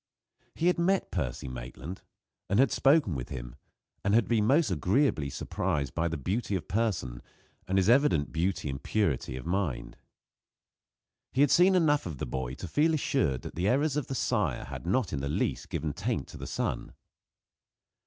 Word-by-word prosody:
He 165 - -2
had 180 0 +3
met 190 +3 +1
Percy 65 -1 -3
Maitland, 65 +6 -7 0.5
and 100 - +2
had 135 -2 +4
spoken 140 - +4
with 60 -4 -5
him, - - -6 0.5
and 100 +1 +3
had 115 - +3
been 110 -3 +2
most 140 - +3
agreeably 90 - +1
surprised 75 -1 -2
by 85 0 0
the 85 -1 -3
beauty 100 - -1
of 85 - -4
person, 95 - -1 0.5
and 95 +1 +1
his 95 - +3
evident 115 - +4
beauty 85 0 -1
and 70 0 -4
purity 80 -11 0
of 65 - -8
mind. 90 -5 -2 1.4
He 130 - +2
had 145 - +5
seen 185 +2 +6
enough 150 - +3
of 80 -5 -6
the - - -3
boy 65 +1 -4
to 90 - -7
feel 155 - +2
assured 125 - 0
that - - -7
the 90 +4 -1
errors 140 +5 +2
of 150 -4 -1
the 135 - -3
sire - - 0
had 65 +4 -8
not 105 -1 +1
in 70 - -1
the 70 - -2
least - - -1
given 75 -2 -2
taint - - -2
to - - -9
the - - -7
son. - - -3
95 Hz, 185 wpm, -29 LUFS, -, 1.4 s, seen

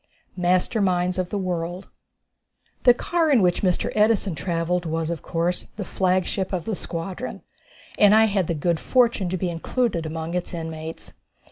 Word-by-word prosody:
Master 185 +4 +1
Minds 180 -1 +1
of 180 -1 -1
the 205 - -2
World. 180 0 -3 1.0
The 245 - +9
car 335 +4 0
in 275 -5 +5
which 175 -1 +2
Mr. 180 -3 +1
Edison 210 -3 +2
travelled 170 +1 -1
was, 160 +1 -1
of 170 - -4
course, 170 +1 -2
the 205 - -4
flagship 185 +1 0
of 180 -4 -2
the 220 - -2
squadron, 185 +6 -5 0.6
and 205 0 +7
I 220 0 +6
had 195 -5 0
the 170 - -1
good 165 +2 0
fortune 235 -7 +2
to 185 - -1
be 180 0 -1
included 170 0 -1
among 160 +1 -4
its 180 0 -3
inmates. 160 -1 -7
180 Hz, 165 wpm, -24 LUFS, 170-200 Hz, 1.0 s, The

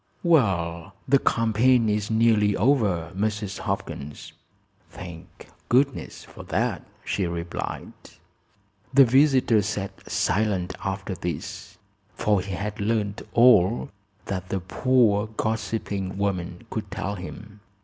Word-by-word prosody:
"Well, 95 - +1
the 140 +1 +5
campaign 115 +1 +3
is 105 -1 0
nearly 110 -2 +3
over, 100 - +2
Mrs. 105 0 -2
Hopkins." 70 +1 -5 0.6
"Thank 85 -3 -11 0.2
goodness 135 +3 +1
for - - -12
that!" - - -1 0.2
she 95 -3 -1
replied. 85 0 -5 1.0
The 135 0 +7
visitor 130 -3 +4
sat 100 -1 -5
silent 95 -3 0
after 95 0 -3
this, 85 -4 -6 0.4
for 105 -3 +2
he 95 0 -6
had 105 +2 -4
learned 105 -1 -1
all 115 0 +5 0.3
that 95 -2 -4
the 95 - -1
poor 110 +2 +2
gossiping 110 -3 -3
woman 95 0 -2
could 110 -2 -4
tell 100 +1 -3
him. 100 +2 -9
105 Hz, 110 wpm, -25 LUFS, 95-115 Hz, 1.0 s, The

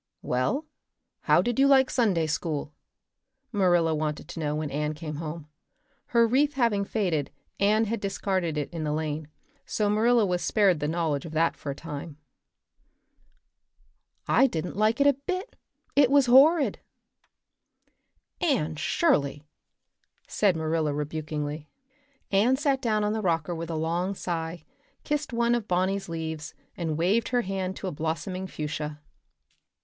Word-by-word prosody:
"Well, 130 - 0 0.6
how - - +5
did 240 +1 -1
you 275 - +6
like 265 -1 +5
Sunday 195 -10 +2
school?" 150 -1 -3 0.8
Marilla 175 -6 +3
wanted 150 -1 -3
to - - -7
know 150 -1 -1
when 155 -1 -3
Anne 150 +2 -2
came 150 -1 -6
home. 155 -1 -6 0.6
Her 235 -1 +4
wreath 280 +6 +2
having 230 -6 +2
faded, 180 -10 -1 0.3
Anne 215 +3 +3
had 225 +1 -2
discarded 190 -4 -1
it 145 - -3
in 165 -2 -3
the 150 -1 -1
lane, 155 -1 -3 0.4
so 210 -1 0
Marilla 225 +1 +4
was 180 -2 -1
spared 195 -7 +3
the 150 - -1
knowledge 160 -3 -1
of 160 - -8
that 165 +1 +2
for 145 - -7
a 140 - -3
time. 150 -1 -7 2.1
"I 270 - +5
didn't 170 -7 -4
like 215 +4 +2
it 280 - +4
a 285 - +6
bit. 370 - -5 0.4
It 280 -3 +5
was 280 -1 +5
horrid." 280 +5 +5 1.6
"Anne 225 - 0
Shirley!" 145 - +1 0.8
said 200 -4 +2
Marilla 160 -2 0
rebukingly. 150 0 -4 0.6
Anne 215 +7 +4
sat 275 -2 +1
down 215 -3 +1
on 210 0 0
the 220 - -2
rocker 170 -3 0
with 165 0 -5
a 165 - -2
long 170 +5 -1
sigh, 165 -2 -4 0.4
kissed 295 -1 -2
one 235 0 +2
of 235 -3 -1
Bonny's 185 +1 0
leaves, 160 -2 -5 0.2
and 160 -3 -2
waved 195 +8 +2
her 245 -1 +1
hand 190 -1 -3
to - - -7
a - - -2
blossoming 165 +5 -3
fuchsia. 150 -2 -5
175 Hz, 150 wpm, -27 LUFS, 155-225 Hz, 2.1 s, you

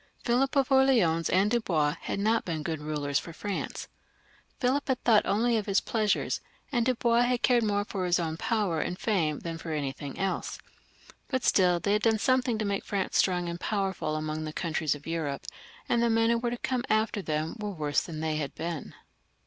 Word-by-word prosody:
Philip 260 +3 +1
of 275 -1 +2
Orleans 235 -12 +4
and 195 +3 +3
Dubois 165 -11 +1
had - - -3
not 220 +2 +2
been 160 -3 -3
good 160 -1 -3
rulers 150 -2 -1
for 165 - -9
France. 200 +4 -4 0.7
Philip 265 +3 +1
had 260 -2 -1
thought 220 -3 +4
only 230 +3 +2
of 215 - -3
his 195 -1 +3
pleasures, 215 -3 0 0.3
and 240 -3 +1
Dubois 235 -1 +3
had 245 0 +1
cared 245 -2 +4
more 205 -1 +1
for 190 -3 -3
his 175 0 +3
own 160 -2 -2
power 195 -4 0
and 180 - -3
fame 165 -10 0
than 165 -1 -5
for 165 - -6
anything 140 -1 -4
else; 195 0 -2 0.7
but 260 -2 -1
still 180 -2 +4
they 200 +3 +1
had 210 - +2
done 225 0 +3
something 255 0 +2
to 215 - -1
make 200 -1 -1
France 195 -2 -2
strong 180 -2 +2
and 170 0 -4
powerful 195 -7 -1
among 155 0 -3
the 155 0 -5
countries 160 -4 -1
of 145 - -13
Europe, 160 -4 -3 0.4
and 235 - +2
the 235 - +3
men 225 0 +3
who 235 - +2
were 240 0 -1
to 240 - -3
come 250 0 -1
after 215 -1 +1
them 155 -2 -2
were 210 -1 -3
worse 150 -6 0
than 155 -2 -6
they 155 -1 -1
had 145 -2 -4
been. 165 -2 -5
195 Hz, 205 wpm, -28 LUFS, 160-230 Hz, 0.7 s, Orleans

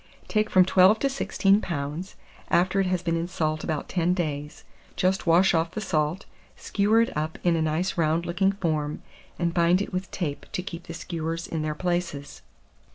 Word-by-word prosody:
Take 215 0 +1
from 185 -1 +5
12 190 +3 +5
to 275 - 0
16 205 -6 +2
lbs., 160 +3 -4 0.3
after 185 +3 +2
it 195 - +2
has 180 -1 -1
been 165 -1 0
in 165 +1 -1
salt 155 -3 -2
about 155 -2 -3
10 180 0 +1
days; 150 -3 -4 0.3
just 185 0 0
wash 180 +4 +5
off 165 0 +1
the 215 - -5
salt, 160 -2 -1 0.3
skewer 215 +2 +2
it 230 - -1
up 155 +1 -2
in 175 -1 +3
a 165 - 0
nice 160 +4 -1
round 165 +1 +1
looking 190 +3 +1
form, 155 -6 -2 0.3
and 170 -1 0
bind 170 +1 +3
it 200 - -4
with 185 +1 -3
tape 150 -6 -4
to 180 - -2
keep 175 -1 -8
the 165 - -6
skewers 165 0 -4
in 160 - -3
their 155 0 -2
places. 175 -5 -3
175 Hz, 190 wpm, -26 LUFS, 160-185 Hz, 0.3 s, from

